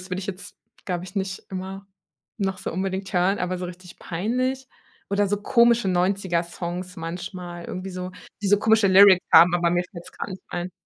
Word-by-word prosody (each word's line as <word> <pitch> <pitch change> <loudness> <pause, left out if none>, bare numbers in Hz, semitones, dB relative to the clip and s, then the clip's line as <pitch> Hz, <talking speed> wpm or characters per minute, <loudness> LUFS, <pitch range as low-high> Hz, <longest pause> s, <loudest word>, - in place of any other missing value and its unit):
das 185 +1 -11
würde 185 - -2
ich 190 - -7
jetzt, 195 -1 -7 0.3
glaub 180 -2 -2
ich, 185 +2 -10
nicht 190 -1 -3
immer, 190 +1 -6 0.5
noch 190 -2 -1
so - - -4
unbedingt 190 +1 -3
hören, 185 +3 +2
aber 180 0 -2
so 180 - -4
richtig 180 0 -11
peinlich? 255 +9 -2 0.4
Oder 200 0 +2
so 205 +1 0
komische 235 -1 +4
90er 180 -1 +1
Songs 180 +2 -6
manchmal, 175 +1 -6
irgendwie 185 +1 -6
so, 180 0 -5 0.3
die 200 - 0
so 205 - +5
komische 220 0 +4
Lyrics 190 -1 +7
haben, 175 +1 +8
aber 170 -1 +2
mir 175 0 +2
fällt's 170 -1 -10
gar - - -6
nicht 190 -1 -8
rein. 175 +1 -4
185 Hz, 195 wpm, -24 LUFS, 180-200 Hz, 0.5 s, haben